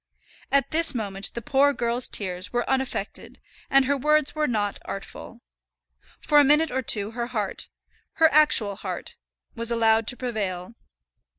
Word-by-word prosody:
At 275 -2 +2
this 320 -3 +3
moment 200 -3 -4
the 235 - -5
poor 285 +1 +3
girl's 240 -1 0
tears 180 -2 -2
were 240 0 -1
unaffected, 265 -1 -3 0.3
and 275 0 +4
her 280 +2 +1
words 300 +1 +1
were 305 -1 0
not 205 -4 -2
artful. 195 - -9 0.8
For 295 - +3
a - - +7
minute 300 +3 +3
or 260 +1 -1
two 210 -3 0
her 235 +1 -4
heart, 215 -5 -4 0.4
her 325 - +5
actual 230 -10 +3
heart, - - -6 0.4
was 230 -1 -2
allowed 225 -1 +2
to 250 - -4
prevail. 205 -5 -4
240 Hz, 155 wpm, -24 LUFS, 210-280 Hz, 0.8 s, a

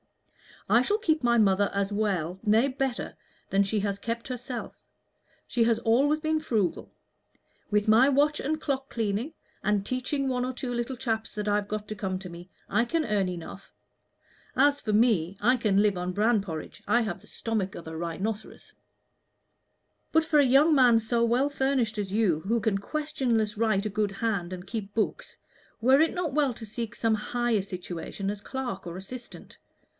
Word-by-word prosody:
"I 235 - +5
shall 410 +11 +1
keep 315 -7 +1
my 235 0 +4
mother 200 -2 +3
as 200 0 0
well 190 -4 -1
nay, 220 +4 +4
better 265 -2 -3 0.3
than 195 - +3
she 200 +1 0
has 200 -1 -2
kept 230 +3 -4
herself. 250 0 -6 0.6
She 240 - +2
has 230 -1 +3
always 280 +7 +3
been 315 0 0
frugal. 215 - -1 0.8
With 210 0 +1
my 230 +6 +6
watch 290 +2 +2
and 310 +3 -1
clock 270 -3 -2
cleaning, 225 +6 -2 0.3
and 205 -1 +1
teaching 270 +3 -1
one 250 -1 0
or 260 - -3
two 245 0 -4
little 240 +2 -2
chaps 225 -3 -2
that 210 0 -3
I've 205 0 +1
got 210 0 -4
to 215 - -5
come 190 -2 -2
to 185 -1 -8
me, 175 +1 -11 0.2
I 225 +4 +2
can 320 +5 0
earn 205 -5 +1
enough. 180 +2 -8 0.8
As 285 +2 +3
for 215 - -2
me, 205 -5 +3
I 245 +5 +4
can 205 -4 +2
live 205 -3 +2
on 180 +1 -3
bran 215 +2 +3
porridge. 160 -5 -7
I 240 - +4
have 220 -3 -3
the - - -19
stomach 215 -4 -3
of 165 - -9
a 160 - -6
rhinoceros." 190 +6 -5 1.4
"But 320 0 +3
for 310 -2 +3
a 285 - +6
young 280 +5 +5
man 250 -5 +6
so 230 +1 0
well 245 +5 +2
furnished 265 -6 0
as 195 -2 -3
you, 205 -8 +2
who 230 +6 0
can 215 -2 +1
questionless 240 -5 -1
write 215 -3 +1
a - - 0
good 210 0 0
hand 195 -4 -2
and 180 0 -7
keep 205 -2 -6
books, 220 - -2 0.4
were 260 +5 +5
it 320 - +3
not 350 -6 -2
well 285 -3 +2
to 225 - -8
seek 230 +2 -5
some 225 -1 +2
higher 235 0 0
situation 185 +1 -5
as 205 -1 -7
clerk 245 -7 -5
or 170 +1 -6
assistant? 240 +6 -9
225 Hz, 185 wpm, -27 LUFS, 200-255 Hz, 1.4 s, my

